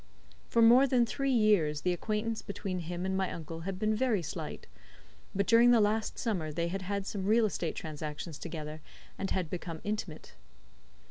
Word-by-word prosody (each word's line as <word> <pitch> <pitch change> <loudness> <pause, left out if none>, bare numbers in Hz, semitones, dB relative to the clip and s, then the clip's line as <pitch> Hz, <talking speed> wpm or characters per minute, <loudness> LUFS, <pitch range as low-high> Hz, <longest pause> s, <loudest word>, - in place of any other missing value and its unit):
For 230 - +4
more 245 +4 +7
than 245 -2 +3
three 275 +4 -2
years 205 - +3
the 180 - +1
acquaintance 215 +4 -2
between 195 -2 -4
him 175 +2 -4
and 190 0 -1
my 190 -1 0
uncle 165 0 -6
had 185 +3 -4
been 215 +2 +1
very 215 -5 +1
slight, - - -6 0.7
but 200 +1 +2
during 235 +3 +6
the 240 -1 +6
last 215 +1 +1
summer 180 -10 -1
they 170 +2 -1
had 195 +2 -3
had 200 +1 -3
some 195 -1 -3
real 225 +1 +5
estate 175 -5 -2
transactions 155 0 -6
together, 155 -2 -6 0.4
and 195 - -2
had 185 -3 0
become 165 -1 -5
intimate. 200 -7 -4
190 Hz, 180 wpm, -31 LUFS, 165-215 Hz, 0.7 s, more